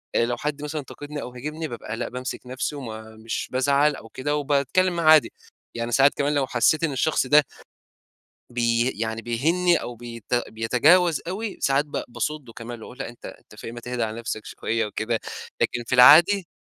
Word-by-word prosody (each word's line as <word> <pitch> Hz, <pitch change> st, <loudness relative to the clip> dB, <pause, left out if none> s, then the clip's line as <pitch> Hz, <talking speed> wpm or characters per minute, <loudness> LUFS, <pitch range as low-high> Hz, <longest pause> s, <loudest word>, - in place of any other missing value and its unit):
آآ 115 Hz, -, +3 dB
لو 120 Hz, 0 st, -2 dB
حد 150 Hz, -1 st, -3 dB
مثلًا 150 Hz, +1 st, -3 dB
انتقدني، 145 Hz, +2 st, -8 dB
أو -, -, -6 dB
هاجمني 150 Hz, +5 st, -5 dB
بابقى 115 Hz, -2 st, -6 dB
لأ، -, -, -3 dB
بامسك 125 Hz, +1 st, -5 dB
نفسي 130 Hz, +4 st, -3 dB
وما 110 Hz, -5 st, -8 dB
مش 110 Hz, +1 st, -4 dB
بازعل 140 Hz, +3 st, +2 dB
أو 115 Hz, -, -12 dB
كده، 145 Hz, +5 st, -2 dB
وباتكلّم 150 Hz, +6 st, +1 dB
معاه 155 Hz, -2 st, +6 dB
عادي. 155 Hz, -, +4 dB, 0.4 s
يعني 115 Hz, 0 st, -3 dB
ساعات 135 Hz, +3 st, +5 dB
كمان 145 Hz, +1 st, 0 dB
لو 140 Hz, -2 st, +1 dB
حسّيت 140 Hz, +7 st, +2 dB
إن 160 Hz, -, +1 dB
الشخص 135 Hz, 0 st, +1 dB
ده 150 Hz, +1 st, +6 dB, 1.1 s
بي 120 Hz, +1 st, +1 dB
يعني 110 Hz, +1 st, -4 dB
بيهينّي، 165 Hz, +10 st, +2 dB
أو 120 Hz, -, -5 dB
بيت 115 Hz, -1 st, -9 dB, 0.2 s
بيَتجاوز 145 Hz, +9 st, +3 dB
أوي، 205 Hz, +3 st, -4 dB
ساعات 140 Hz, +1 st, +2 dB
ب 150 Hz, -, -4 dB
باصُدّه 140 Hz, -1 st, -4 dB
كمان 115 Hz, 0 st, -8 dB
واقول: 125 Hz, -, -11 dB
"لأ 135 Hz, -, -4 dB
أنت 120 Hz, -, -15 dB
أنت -, -, -13 dB
في -, -, -12 dB
إيه؟ 115 Hz, -, -6 dB
ما 120 Hz, -, -8 dB
تهدا 120 Hz, -1 st, -2 dB
على 110 Hz, +1 st, -6 dB
نفسك 110 Hz, -2 st, -5 dB
شوية 115 Hz, -1 st, -2 dB
وكده." 110 Hz, +2 st, -2 dB, 0.4 s
لكن 120 Hz, -1 st, 0 dB
في -, -, -1 dB
العادي 170 Hz, +10 st, +7 dB
130 Hz, 190 wpm, -24 LUFS, 115-150 Hz, 1.1 s, العادي